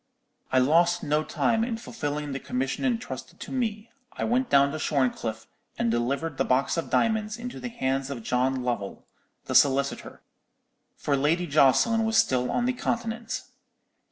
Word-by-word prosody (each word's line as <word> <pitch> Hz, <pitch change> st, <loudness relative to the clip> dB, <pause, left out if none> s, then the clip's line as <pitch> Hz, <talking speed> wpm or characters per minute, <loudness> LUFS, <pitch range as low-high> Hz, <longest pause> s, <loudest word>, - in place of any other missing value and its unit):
"I 130 Hz, -, +3 dB
lost 170 Hz, +6 st, +3 dB
no 150 Hz, +1 st, +1 dB
time 225 Hz, +7 st, +1 dB
in 230 Hz, -1 st, -2 dB
fulfilling 150 Hz, -10 st, -4 dB
the 135 Hz, -, -3 dB
commission 135 Hz, -, -3 dB
intrusted 245 Hz, -3 st, -3 dB
to -, -, -7 dB
me. 225 Hz, -3 st, -2 dB, 0.2 s
I -, -, -5 dB
went 250 Hz, +3 st, +1 dB
down 140 Hz, 0 st, +5 dB
to 155 Hz, -, -4 dB
Shorncliffe, 120 Hz, -6 st, -1 dB, 0.3 s
and 115 Hz, -, +1 dB
delivered 135 Hz, +6 st, -1 dB
the -, -, +2 dB
box 130 Hz, +2 st, +1 dB
of 165 Hz, -, -3 dB
diamonds 215 Hz, -1 st, +1 dB
into 245 Hz, +1 st, -7 dB
the 245 Hz, -, -5 dB
hands 135 Hz, -, -1 dB
of 125 Hz, -5 st, -6 dB
John 130 Hz, +2 st, 0 dB
Lovell, 120 Hz, -6 st, -3 dB, 0.4 s
the -, -, -4 dB
solicitor; 140 Hz, 0 st, +2 dB, 0.7 s
for 145 Hz, -, 0 dB
Lady 155 Hz, +6 st, +1 dB
Jocelyn 155 Hz, -, +4 dB
was 220 Hz, 0 st, +1 dB
still 125 Hz, -1 st, +2 dB
on 245 Hz, -, 0 dB
the 255 Hz, -, +1 dB
Continent. 230 Hz, -2 st, -3 dB
150 Hz, 160 wpm, -26 LUFS, -, 0.7 s, down